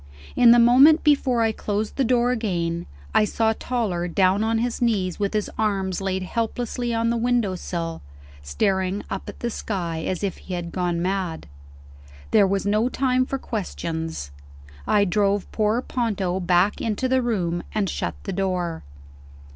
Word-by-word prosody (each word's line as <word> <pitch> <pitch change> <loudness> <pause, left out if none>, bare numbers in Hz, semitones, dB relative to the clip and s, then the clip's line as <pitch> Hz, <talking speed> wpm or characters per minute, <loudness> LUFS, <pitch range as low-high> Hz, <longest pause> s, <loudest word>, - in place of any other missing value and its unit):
In 245 -1 +6
the 240 - +8
moment 260 +7 +6
before 270 -5 +3
I 225 - +2
closed 210 0 -3
the 275 - +1
door 245 0 +2
again, 175 -8 -2 0.3
I - - +5
saw 220 +1 +1
Toller 215 -8 -2
down 190 +3 +2
on 225 0 +1
his 240 +1 -2
knees 200 -7 0
with 200 +1 -1
his 210 - 0
arms 195 -3 0
laid 190 -1 -1
helplessly 235 +3 -2
on 230 0 +1
the 235 - 0
window 235 -4 +1
sill, 165 -2 -4 0.4
staring 190 - -1
up 195 - -4
at - - -11
the 235 - -2
sky 175 -7 -3
as 185 +1 -2
if 195 -3 -2
he 185 - -6
had 170 -1 -5
gone 175 -2 -1
mad. 185 -3 -2 0.9
There 200 - +5
was 195 +1 -1
no 215 +4 +2
time 255 -1 +1
for 270 - -2
questions; 165 - -4 0.6
I 205 -1 +4
drove 200 +1 0
poor 220 +3 +1
Ponto 200 -7 -1
back 180 +2 +2
into 225 +3 -1
the 260 0 +2
room, 180 -8 -1
and 210 -2 0
shut - - -3
the 195 - -4
door. 180 -3 -2
205 Hz, 165 wpm, -23 LUFS, 180-235 Hz, 0.9 s, the